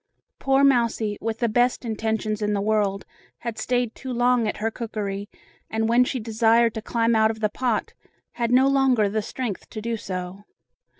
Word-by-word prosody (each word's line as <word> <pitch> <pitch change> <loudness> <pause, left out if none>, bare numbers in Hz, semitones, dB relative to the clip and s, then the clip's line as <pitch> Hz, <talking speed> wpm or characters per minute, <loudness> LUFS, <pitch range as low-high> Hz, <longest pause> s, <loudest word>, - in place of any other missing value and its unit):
Poor 270 0 +3
mousie, 235 -5 +2
with 225 0 -2
the 235 - +1
best 245 +3 +1
intentions 220 -1 -2
in 210 0 0
the 200 - 0
world, 200 -1 0 0.3
had 230 -2 -5
stayed 245 0 0
too 260 - -7
long 245 -1 +2
at - - -2
her 225 +1 -1
cookery, 210 -3 -4 0.4
and 220 0 0
when 240 +2 +5
she 250 +1 -2
desired 230 +1 +3
to 220 - -5
climb 230 +1 +1
out 220 0 +4
of 220 0 -4
the 210 -1 +1
pot, 240 -1 -1 0.4
had 235 -1 -2
no 260 +2 +5
longer 265 -6 +3
the 215 +2 -1
strength 225 -1 -5
to 215 - -6
do 230 +2 -2
so. 185 -1 -6
225 Hz, 185 wpm, -24 LUFS, 215-245 Hz, 0.4 s, when